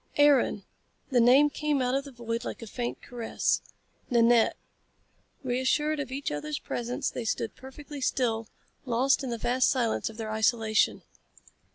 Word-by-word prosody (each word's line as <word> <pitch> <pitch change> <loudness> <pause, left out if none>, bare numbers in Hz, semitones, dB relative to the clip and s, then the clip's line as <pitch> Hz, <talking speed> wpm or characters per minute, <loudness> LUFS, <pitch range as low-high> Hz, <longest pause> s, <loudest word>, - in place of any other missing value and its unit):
"Aaron!" 290 -1 +4 0.5
The 250 - +4
name 270 +5 +6
came 300 -1 0
out 250 -1 0
of 275 +1 0
the 280 - -9
void 235 -1 -4
like 245 - -6
a - - -6
faint 240 +2 -5
caress. 235 -2 -1 0.5
"Nanette." 235 -2 +4 0.9
Reassured 260 +4 +1
of 275 -3 -4
each 275 +2 -3
other's 150 0 -3
presence 245 +1 -3
they 245 - -4
stood 225 0 -2
perfectly 280 +2 -10
still, 230 -4 0 0.4
lost 260 +3 +2
in 260 - -3
the 235 - -2
vast 250 +3 +2
silence 235 -4 0
of 220 - -12
their 220 -2 -4
isolation. 220 0 +2
245 Hz, 155 wpm, -28 LUFS, 230-270 Hz, 0.9 s, name